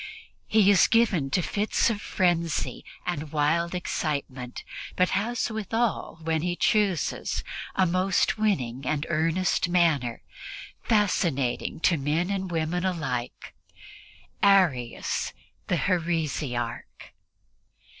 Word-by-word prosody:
He 210 -2 +5
is 195 - +6
given 205 -12 +2
to 175 +6 +1
fits 210 +5 +1
of 210 -1 -4
frenzy 170 -3 0 0.2
and 155 -4 -3
wild 165 +4 +1
excitement, 140 -7 -3 0.3
but 185 0 +3
has 225 +4 -1
withal, 220 -2 -1
when 160 -1 0
he 175 +1 -1
chooses, 195 -5 0 0.3
a 190 - +3
most 185 +1 +2
winning 135 - -1
and 155 0 -1
earnest 170 +3 +1
manner, 155 -9 +1 0.6
fascinating 170 - 0
to 170 - +3
men 155 +6 0
and 190 -1 -2
women 165 +1 -1
alike 145 -10 -3 0.9
Arius 175 -12 +2 0.3
the - - +1
heresiarch. 155 -9 -2
170 Hz, 105 wpm, -26 LUFS, 150-190 Hz, 0.9 s, is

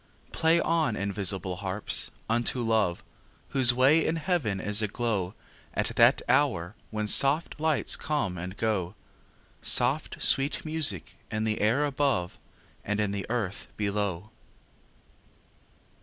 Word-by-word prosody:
Play 165 +1 +2
on, 160 -9 +1
invisible 100 -2 -2
harps, 95 +2 +2 0.2
unto 120 +2 0
Love, 110 -6 0 0.5
Whose 130 -3 +4
way 135 +6 +4
in 160 - 0
heaven 155 - -1
is 105 +2 0
aglow 105 -3 -2 0.4
At - - -1
that - - +4
hour 85 +3 +1 0.2
when 105 -1 -3
soft 140 +8 +2
lights 155 -2 +2
come 145 -12 -2
and 90 +3 -7
go, 105 -4 -1 0.7
Soft 130 +5 +2
sweet 140 +4 +2
music 155 - 0
in 110 0 -2
the 110 -1 -1
air 120 +8 +2
above 135 -11 -1 0.4
And 105 +1 -2
in 105 -2 0
the 100 -1 -4
earth 110 -5 -3
below. 100 -1 -2
110 Hz, 125 wpm, -27 LUFS, 100-140 Hz, 0.7 s, Whose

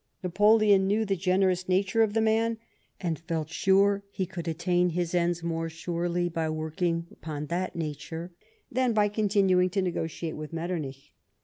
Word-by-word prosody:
Napoleon 205 +1 +4
knew 215 +3 +2
the 195 -1 0
generous 185 0 +1
nature 195 +4 +2
of 215 -1 +2
the 225 - +3
man, 225 +1 +2 0.4
and 165 -5 -2
felt 165 -2 -3
sure 200 +2 +3
he 190 -1 -2
could 175 -2 -7
attain 175 +2 +1
his 175 0 -2
ends 175 -1 +1
more 165 -1 -2
surely 175 +1 -2
by 165 -2 -2
working 165 +2 -1
upon 150 -2 -6
that 185 +1 -2
nature, 160 +2 -5 0.4
than 255 -1 +1
by 210 -1 +3
con 210 0 0
tinuing 185 -3 +3
to 200 - +2
negotiate 165 -2 -3
with 155 +1 -7
Mctternich. 155 -5 -4
180 Hz, 165 wpm, -28 LUFS, 165-195 Hz, 0.4 s, Napoleon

